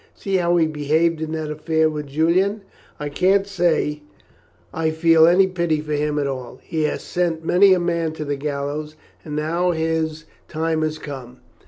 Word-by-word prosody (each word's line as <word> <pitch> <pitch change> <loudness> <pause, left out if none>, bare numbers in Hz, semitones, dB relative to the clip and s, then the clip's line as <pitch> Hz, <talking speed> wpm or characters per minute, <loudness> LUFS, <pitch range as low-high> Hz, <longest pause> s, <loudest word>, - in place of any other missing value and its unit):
See 195 -1 -1
how 175 -1 +2
he 165 - +4
behaved 155 +2 0
in 160 0 -3
that 155 -1 -3
affair 160 +1 +1
with 150 -2 -4
Julian. 180 +8 +1 0.4
I 150 - -3
can't 190 +6 +2
say 170 -6 0 0.7
I 160 0 0
feel 160 0 +5
any 180 +3 +5
pity 170 -4 -1
for 150 0 -4
him 150 0 0
at 145 - 0
all, 130 -3 -5
he 155 -2 -1
has - - -2
sent 170 -2 -2
many 190 +2 +5
a - - 0
man 170 -2 -1
to 155 -1 -5
the 145 0 -1
gallows, 145 +2 -4 0.3
and 150 -2 -6
now 165 +4 0
his 160 -1 -1 0.2
time 160 0 -1
has 155 0 -1
come." 130 -5 -9
160 Hz, 180 wpm, -21 LUFS, 150-170 Hz, 0.7 s, feel